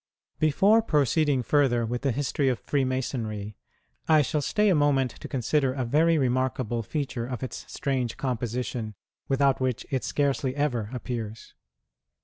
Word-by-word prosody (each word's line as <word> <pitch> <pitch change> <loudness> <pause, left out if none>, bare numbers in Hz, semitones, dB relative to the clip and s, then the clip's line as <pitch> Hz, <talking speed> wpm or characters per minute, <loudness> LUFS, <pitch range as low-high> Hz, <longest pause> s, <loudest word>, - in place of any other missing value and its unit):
Before 195 +9 +4
proceeding 145 - +2
further 125 -4 +2
with 120 +2 -3
the 135 -1 +1
history 140 +2 0
of 125 - 0
Freemasonry, 120 -6 -2 0.5
I 155 -2 +5
shall 150 +2 -1
stay 210 +8 +2
a - - +5
moment 145 -5 +2
to - - -10
consider 135 +1 0
a 130 -2 -2
very 160 +6 +3
remarkable 130 -3 0
feature 130 -1 -3
in 125 -1 -3
its 130 - -7
strange 130 -4 -2
composition, 120 -3 -3 0.3
without 135 -1 +2
which 130 -1 -1
it 130 -2 0
scarcely 140 -2 0
ever 125 -8 -1
appears. 115 -3 -6
130 Hz, 140 wpm, -26 LUFS, 120-145 Hz, 0.5 s, I